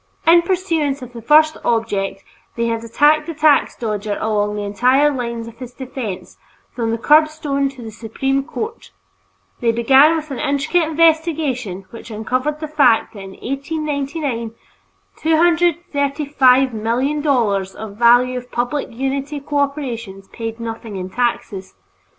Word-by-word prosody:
In 340 +1 +7
pursuance 330 -7 -1
of 245 -1 -10
the 235 - -8
first 310 +5 +4
object, 205 -4 -1 0.3
they 235 - -1
had 230 0 -2
attacked 300 +7 +3
the 330 - -5
tax 300 -1 +3
dodger 210 -2 -3
along 210 -1 0
the 210 - -3
entire 255 +8 +3
line 235 -3 -4
of 230 - -13
his 250 -1 -8
defense, 255 -7 -7 0.3
from 230 -2 -3
the 230 - 0
curbstone 295 0 +2
to 270 -3 -11
the 220 - -7
Supreme 270 +5 -2
Court. 445 +10 -6 0.7
They 235 -1 +2
began 265 +7 +5
with 310 -2 -5
an 265 - -4
intricate 310 +3 +1
investigation 310 - +1
which 230 - -10
uncovered 255 +8 -2
the 310 - -3
fact 275 -9 +3
that 210 - -10
in 195 0 -9
1899, 280 -4 -3 0.6
$235,000,000 280 - +1
of 215 -2 -8
value 245 +2 +4
of 250 0 -16
public 245 +4 -2
utility 270 +4 -3
corporations 270 -9 -3
paid 225 0 -6
nothing 225 -2 -6
in 185 0 -5
taxes. 220 - -2
260 Hz, 135 wpm, -19 LUFS, 230-300 Hz, 0.7 s, In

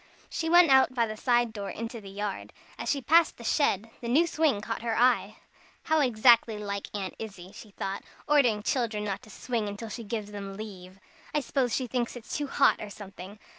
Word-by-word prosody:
She 325 - -2
went 345 -3 +7
out 265 -1 +5
by 235 -2 +3
the 215 -1 -5
side 240 0 +1
door 200 -2 -5
into 230 0 -6
the 195 - -10
yard. 200 0 -5 0.3
As - - -3
she 280 -2 0
passed 330 +5 +4
the 235 - -11
shed, 225 -5 +1
the 235 - -5
new 290 +8 +4
swing 315 -9 +1
caught 225 +2 -4
her 230 -1 -1
eye. 250 +1 +3 0.5
"How 315 0 +2
exactly 235 -3 +4
like 200 -1 -4
Aunt 195 -2 -3
Izzie," 195 -4 -8
she 215 - -11
thought, 195 -1 -4 0.3
"ordering 275 -7 +4
the - - -19
children 230 -4 -1
not 200 -2 -3
to - - -16
swing 215 -2 -3
till 225 +1 -7
she 230 +2 -6
gives 210 -1 -4
them 200 -1 -7
leave. 190 -3 -9 0.4
I - - +4
suppose 255 -3 0
she 260 - -1
thinks 240 0 -2
it's 240 -2 -7
too 290 -1 -2
hot, - - +3
or 210 - -6
something. 195 0 -10
225 Hz, 210 wpm, -28 LUFS, 205-255 Hz, 0.5 s, went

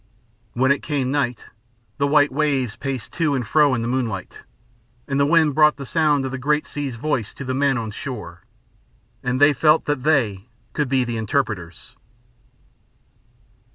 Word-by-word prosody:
When 130 +2 +2
it 140 - +1
came 140 -4 -2
night, 130 -4 -1 0.5
the 140 - +2
white 145 0 +4
waves 135 -6 0
paced 135 -4 -5
to 155 -4 0
and 125 -4 -3
fro 150 -4 +4
in 115 - -2
the - - -2
moonlight, 120 -7 -3 0.7
and 140 0 -1
the 140 - +3
wind 160 -2 +4
brought 150 +1 +5
the 140 - -7
sound 150 -2 +1
of 130 - -4
the 130 - -5
great 150 +3 +1
sea's 140 -4 -5
voice 120 -3 -2
to 140 - -7
the 130 - -2
men 135 0 +1
on 110 -2 -4
shore, 105 -8 -7 0.8
and 125 +1 -1
they 145 +1 +6
felt 155 +3 +3
that 145 -3 -1
they 120 -9 +1 0.3
could 150 -4 -1
then 130 -1 +2
be 120 -1 -3
interpreters. 105 - -3
135 Hz, 170 wpm, -22 LUFS, 120-145 Hz, 0.8 s, they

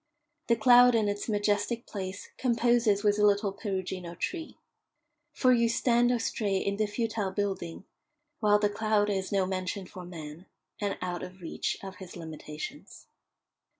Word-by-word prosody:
The 235 - +4
cloud 245 +2 +7
in 220 -2 +2
its 205 +2 -2
majestic 205 +2 0
place 190 -1 -6
composes 235 -4 +2
with 205 0 +3
a - - +3
little 205 0 +3
Perugino 185 -3 -4
tree. 325 - -4 0.7
For 255 -1 +4
you 235 -1 +3
stand 240 +1 +3
or 245 - +3
stray 205 -3 -1
in 200 +1 -1
the 215 0 +1
futile 215 -2 -1
building, 190 -3 -3 0.5
while 210 -3 +5
the 210 0 +2
cloud 210 0 +1
is 190 -1 -2
no 195 -2 +2
mansion 185 +1 -3
for 180 0 -10
man, 165 0 -9 0.3
and 205 -1 -1
out 180 -1 -3
of 185 +1 -8
reach 170 - -3
of 190 -1 -8
his 185 -1 -10
limitations. 160 - -8
205 Hz, 155 wpm, -29 LUFS, 185-225 Hz, 0.7 s, cloud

